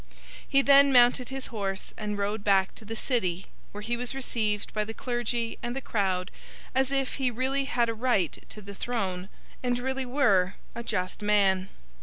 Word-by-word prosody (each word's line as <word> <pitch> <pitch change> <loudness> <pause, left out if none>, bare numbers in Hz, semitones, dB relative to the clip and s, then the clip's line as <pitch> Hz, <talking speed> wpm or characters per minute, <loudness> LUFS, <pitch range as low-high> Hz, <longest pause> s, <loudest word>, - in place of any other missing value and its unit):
He 275 0 +4
then 280 0 +7
mounted 245 0 +5
his 265 -2 -6
horse 195 -2 -3
and 210 -1 -3
rode 205 +1 -2
back 195 -2 +3
to 220 - -13
the 225 +2 -5
City, 190 -7 -1 0.3
where 205 +1 -7
he 235 +2 -1
was 245 +2 -4
received 215 -6 -1
by 215 - 0
the 220 +1 -7
clergy 240 -1 -2
and 240 +1 -3
the - - -1
crowd 190 -6 -1 0.4
as 265 +1 +1
if 270 -1 -1
he 265 -2 +2
really 260 +3 0
had 240 -3 +1
a 230 - -1
right 225 - 0
to 210 - -10
the 200 +1 -8
throne, 195 -5 -3 0.3
and 245 -1 0
really 265 +1 -2
were 200 -9 +3 0.2
a 235 - -5
just 185 -4 -2
man. 195 -3 +3
230 Hz, 185 wpm, -28 LUFS, 200-255 Hz, 0.4 s, then